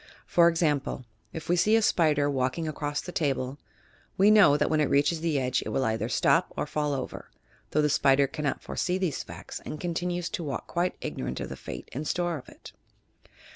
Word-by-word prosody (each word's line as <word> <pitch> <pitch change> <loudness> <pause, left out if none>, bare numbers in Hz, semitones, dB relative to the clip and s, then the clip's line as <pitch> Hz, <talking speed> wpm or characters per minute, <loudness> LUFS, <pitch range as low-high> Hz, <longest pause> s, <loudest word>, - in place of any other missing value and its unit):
For 170 -1 +5
example, 150 -6 0 0.3
if 160 -1 -7
we 175 - +3
see 210 +5 +4
a 225 - +4
spider 150 -7 +3
walking 135 +3 -1
across 145 -1 -3
the 180 - -7
table, 140 -4 -1 0.6
we 200 +2 +6
know 195 -9 +7
that - - +1
when 155 -1 +2
it 150 - +1
reaches 145 +3 +2
the 160 -4 +1
edge, 130 -1 0
it - - -5
will 135 - 0
either 110 0 -1
stop - - +2
or - - 0
fall 150 -1 -1
over, 130 - -6 0.4
though 150 - +1
the - - +4
spider 140 -1 +4
cannot 140 +1 -3
foresee 180 0 -1
these 185 -6 -1
facta - - -9
and 150 - -6
continues 175 +1 -2
to 170 - -4
walk 140 -3 -4
quite 175 +1 -1
ignorant 60 +1 -4
of - - -5
the - - -6
fate - - -8
in 140 +5 -4
store 175 -3 -1
for - - -16
it! - - -13
150 Hz, 205 wpm, -27 LUFS, 140-175 Hz, 0.6 s, know